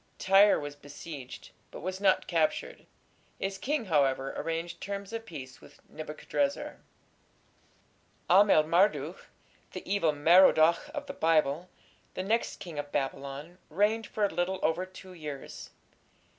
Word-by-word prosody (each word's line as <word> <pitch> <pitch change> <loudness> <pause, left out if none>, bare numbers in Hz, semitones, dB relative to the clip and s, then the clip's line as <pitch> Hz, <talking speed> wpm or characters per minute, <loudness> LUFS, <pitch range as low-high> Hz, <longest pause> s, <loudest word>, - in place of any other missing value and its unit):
Tyre 195 +2 +5
was 145 0 -6
besieged, 145 -1 -10 0.2
but - - -10
was 185 +2 -4
not 190 -2 +3
captured. 160 -3 -1 0.5
Its 195 0 -3
king, 290 -3 -1
however, 135 -5 +1
arranged 165 +1 -4
terms 200 +1 -5
of 225 0 -5
peace 130 -7 -9
with - - -17
Nebuchadrezzar. 155 - -3 1.5
Amel 190 -4 +6
Marduk, 165 -1 +1 0.5
the - - -8
"Evil 195 -6 +2
Merodach" 165 - +5
of 290 -1 -4
the - - -7
Bible, 160 +1 +1 0.5
the 185 - -3
next 225 +4 -1
king 165 -5 -7
of 145 0 -6
Babylon, 140 +4 -4
reigned 210 +6 +1
for 210 - 0
a 200 - -3
little 180 +2 -1
over 175 +3 0
two 185 0 -13
years. 150 -5 -8
170 Hz, 130 wpm, -29 LUFS, 150-195 Hz, 1.5 s, Amel